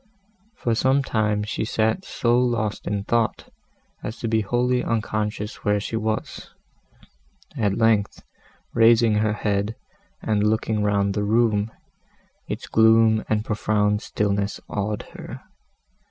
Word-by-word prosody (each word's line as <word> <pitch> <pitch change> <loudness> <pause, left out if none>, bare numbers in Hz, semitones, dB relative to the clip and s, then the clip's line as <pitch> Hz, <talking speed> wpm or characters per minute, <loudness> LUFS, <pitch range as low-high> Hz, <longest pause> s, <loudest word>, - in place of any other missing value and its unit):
For 120 - -1
some 130 +4 +2
time 105 -4 0
she 105 - -3
sat 110 - 0
so 120 0 +1
lost 120 -4 0
in 100 -1 -1
thought, 115 +1 -1 0.5
as 110 - -6
to 115 - -4
be 110 0 +2
wholly 125 +4 +1
unconscious 110 -1 -2
where 105 -1 +2
she 110 - -4
was; 110 0 -3 1.1
at 100 -3 0
length, 110 -3 +1 0.5
raising 115 0 +5
her 105 0 +1
head, 105 +1 -1 0.4
and 105 -2 0
looking 110 0 +1
round 100 -1 +1
the 105 - -1
room, 110 0 +2 0.8
its - - -5
gloom 110 0 +4
and 110 0 0
profound 105 -1 +1
stillness 100 -1 -1
awed 105 0 -3
her. - - -9
110 Hz, 125 wpm, -23 LUFS, 105-115 Hz, 1.1 s, raising